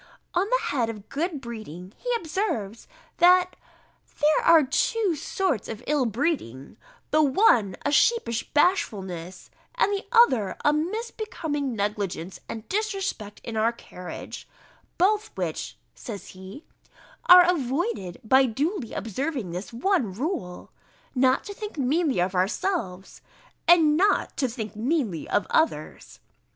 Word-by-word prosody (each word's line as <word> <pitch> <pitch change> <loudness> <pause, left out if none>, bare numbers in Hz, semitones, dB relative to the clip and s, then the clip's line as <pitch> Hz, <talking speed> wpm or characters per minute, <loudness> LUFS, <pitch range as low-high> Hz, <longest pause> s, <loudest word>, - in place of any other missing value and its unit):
On 370 +4 +1
the - - +1
head 245 -5 0
of 210 -2 -8
good 315 +1 -2
breeding, 215 - -9
he - - -7
observes, 305 - -3 0.3
that, 360 +1 +5 0.6
"there 300 +1 +3
are 330 -2 +7
two 385 - +1
sorts 295 - -2
of 225 +2 -7
ill 285 -4 +1
breeding; 220 - -3 0.3
the 310 - +4
one 260 - +3
a 285 - +1
sheepish 295 - +2
bashfulness, 190 - -1 0.2
and 485 -4 +2
the 400 +1 -4
other 260 - +4
a 295 - +5
misbecoming 320 - -3
negligence 200 -4 -3
and 220 -1 -7
disrespect 390 - -3
in 230 - -6
our 220 +1 +2
carriage; 180 -6 -9 0.5
both 420 +4 +2
which," - - -4 0.2
says 215 -6 -8
he, 190 - -11 0.6
"are 360 -1 +9
avoided 245 - -1
by 260 +4 +4
duly 275 - -2
observing 230 - -3
this 180 +4 -6
one 250 - 0
rule, 205 - -4 0.4
not 260 0 +3
to 405 - -7
think 420 -3 -8
meanly 285 - +1
of 180 +2 0
ourselves, 190 - -2 0.5
and 325 -3 +6
not 405 +4 +2
to 265 - 0
think 225 -3 -6
meanly 230 - -1
of - - +1
others." 320 +1 -1
270 Hz, 130 wpm, -25 LUFS, 210-350 Hz, 0.6 s, are